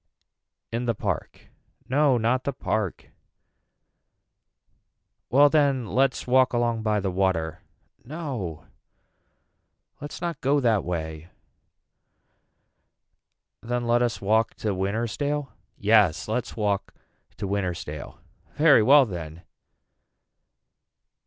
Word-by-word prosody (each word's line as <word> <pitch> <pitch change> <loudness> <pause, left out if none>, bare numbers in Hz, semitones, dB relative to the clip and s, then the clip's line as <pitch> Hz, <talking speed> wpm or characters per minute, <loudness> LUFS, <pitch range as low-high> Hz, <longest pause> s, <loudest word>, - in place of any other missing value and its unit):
In 120 +2 -2
the 115 -2 0
park. - - -4 0.4
No 140 -1 +3
not 120 +3 +1
the 140 - -2
park. 110 -7 -3 2.2
Well 145 +3 +6
then 140 -4 +2
let's 130 +5 +1
walk 130 0 +3
along 120 -1 0
by 105 -1 +1
the 95 -1 -2
water. 90 -4 -1 0.4
No 125 - -6 1.3
let's 145 0 -8
not 170 -1 -4
go 145 +2 +2
that 115 -7 +2
way. 80 -1 -5 2.3
Then 120 +1 -2
let 120 +1 +2
us 120 -1 0
walk 110 +3 +1
to 105 -2 -2
Wintersdale. 120 +9 -2 0.3
Yes 105 -2 +3
let's 115 +2 -3
walk 105 -2 -1 0.4
to - - -4
Wintersdale. 95 -3 -4 0.4
Very 150 -6 +6
well 135 +5 +6
then. 85 -5 -7
115 Hz, 100 wpm, -25 LUFS, 100-130 Hz, 2.3 s, Well